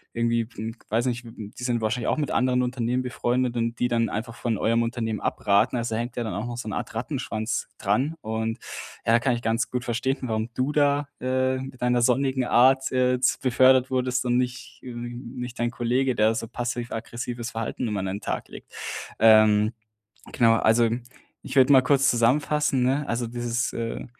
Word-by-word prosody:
irgendwie, 115 -1 +1
hm, 110 +2 -5
weiß 115 +4 +1
nicht 120 0 -2
w - - -9
w 105 -2 -9
die - - -7
sind 120 -2 0
wahrscheinlich 110 +2 -1
auch - - +1
mit 145 -4 -1
anderen 125 +1 +2
Unternehmen 125 0 -1
befreundet 125 0 -1
und 115 0 -2
die 125 - +2
dann 115 -1 +1
einfach 115 +2 -4
von 115 -4 -2
eurem 115 +1 +2
Unternehmen 115 -2 -2
abraten. 100 +4 +1
Also 115 -1 -2
da - - -1
hängt 120 0 -6
ja 120 - -2
dann 110 - -4
auch 105 +5 -3
noch 120 0 -5
so 120 - -6
'ne - - -3
Art - - -5
"Rattenschwanz" 115 -3 -3
dran 125 +10 0
und 110 +1 -2 0.5
ja, 115 +1 +4
kann 120 0 +1
ich 120 - -5
ganz 115 +1 0
gut 125 0 -3
verstehen, 125 +4 -1
warum 110 -1 -2
du 130 +3 0
da, 145 -1 +2
äh, 130 0 0
mit 130 -1 -9
deiner 125 0 +2
sonnigen 130 +1 +2
Art, 130 +2 +4
äh, 125 -1 +2
z 125 - +2
befördert 130 0 +4
wurdest 125 0 0
und 125 0 +2
nicht 125 0 -3
ähm, 120 0 -7
nicht 125 0 -6
dein 120 0 +1
Kollege, 125 +2 0
der 110 +1 +3
so 115 - -3
passiv-aggressives 120 0 -4
Verhalten 115 +2 -3
immer 105 -2 -2
an - - -3
den 100 +2 -3
Tag - - -3
legt. - - -12 0.5
Ähm, 110 -1 +6 0.6
genau, 115 -2 +4
also, 115 +1 +3 0.5
ich 130 - -8
würde 135 +2 +6
mal 130 - +8
kurz 135 +1 +3
zusammenfassen, 135 +3 +2
ne? 135 +3 +1
Also 120 +1 -1
dieses 120 +1 -2
äh, 115 -1 -4
120 Hz, 200 wpm, -25 LUFS, 115-130 Hz, 0.6 s, mal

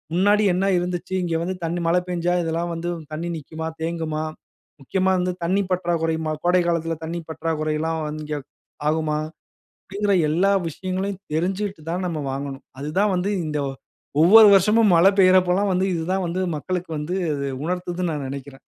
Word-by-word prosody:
முன்னாடி 205 +3 +4
என்ன 185 +2 +1
இருந்துச்சு. 175 +1 -3
இங்க 165 -2 -1
வந்து 185 +2 -2
தண்ணீ 170 +1 -2
மழ 175 +2 +3
பெஞ்சா 175 0 0
இதெல்லாம் 170 +1 -2
வந்து 170 +1 -3 0.2
தண்ணீ 165 +3 -3
நிக்குமா? 160 +2 -6
தேங்குமா? 160 -2 -2 0.6
முக்கியமா 190 +7 +1
வந்து 180 0 0
தண்ணீ 195 +3 +2
பற்றாக்குறையுமா? 165 -3 0
கோடைகாலத்தில 170 -2 +2
தண்ணீர் 165 0 -6
பற்றாக்குறையிலாம் 160 0 -1 0.2
இங்கே 150 -1 -3 0.5
ஆகுமா? 155 -1 0 0.7
அப்பிடிங்கிற 200 +1 0 0.2
எல்லா 180 +6 +3 0.2
விஷயங்களையும் 185 +4 -3 0.2
தெரிஞ்சிட்டு 190 +3 -1
தான் 180 +2 -2
நம்ம 165 -3 -2
வாங்கணும். 140 0 -5 0.2
அதுதான் 185 +9 +1
வந்து 185 +3 0 0.2
இந்த 150 -1 -2 0.6
ஒவ்வொரு 215 +5 +9
வருஷமும் 210 +3 +5
மழ 165 - +5 0.2
பெய்றப்பல்லாம் 185 +1 +4
வந்து 185 +1 +1
இது 165 - -2
தான் 190 -1 0
வந்து 175 +2 -2 0.2
மக்களுக்கு 180 +3 -4
வந்து 165 +5 -3 0.2
அது 140 0 -3 0.2
உணர்த்துதுண்னு 180 0 -2
நான் 145 -3 -3
நினைக்கிறேன். 135 0 -8
175 Hz, 145 wpm, -23 LUFS, 160-185 Hz, 0.7 s, ஒவ்வொரு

